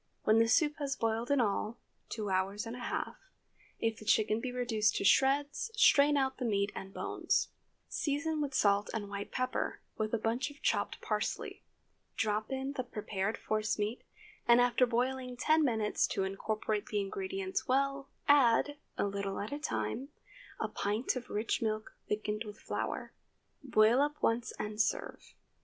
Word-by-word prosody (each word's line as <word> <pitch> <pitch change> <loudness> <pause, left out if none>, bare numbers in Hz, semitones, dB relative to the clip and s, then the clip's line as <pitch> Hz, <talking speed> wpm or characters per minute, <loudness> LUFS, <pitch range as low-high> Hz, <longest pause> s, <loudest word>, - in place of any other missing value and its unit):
When 215 +1 +5
the 230 - +5
soup 295 +5 +3
has 280 -2 -1
boiled 225 +1 -1
in 285 -1 +3
all, 215 0 0 0.3
two 210 -3 -3
hours 195 +3 0
and 230 +1 -5
a - - -8
half, 245 - -3 0.6
if 225 -1 0
the - - -10
chicken 215 0 +3
be 255 - -3
reduced 225 -4 +1
to - - 0
shreds, 285 - +3
strain 290 -9 +6
out 265 -1 +1
the - - -2
meat 200 -2 +1
and 195 - -7
bones. - - 0 0.4
Season 305 +1 -1
with 280 -2 -2
salt 200 -2 +3
and 205 -2 -3
white 200 0 -5
pepper, 255 0 -1 0.2
with 215 0 0
a 230 - +2
bunch 230 +6 -1
of 290 0 -14
chopped - - 0
parsley. - - -2 0.5
Drop 215 0 0
in 265 +1 -2
the 260 -3 -2
prepared 210 -3 -3
force 215 -1 -1
meat, 210 +3 -2 0.5
and 235 0 +7
after 245 +1 +4
boiling 250 +1 -1
ten 315 +4 +3
minutes 220 -6 +1
to 195 - -1
incorporate 210 +2 -2
the 210 - -1
ingredients 380 - -3
well, 275 +1 +1 0.2
add, 285 +1 +5 0.2
a - - +1
little 200 -1 -3
at 210 +6 -4
a 290 - -3
time, 275 -3 -2 0.5
a - - 0
pint 210 +7 -1
of 250 -1 -6
rich 215 +2 -1
milk 215 -1 -2 0.2
thickened 210 +1 -1
with 210 -1 -9
flour. - - -4 0.5
Boil 235 -1 +5
up 295 +1 +1
once 230 +1 +1
and 210 0 -1
serve. - - -3
230 Hz, 170 wpm, -32 LUFS, 210-270 Hz, 0.6 s, and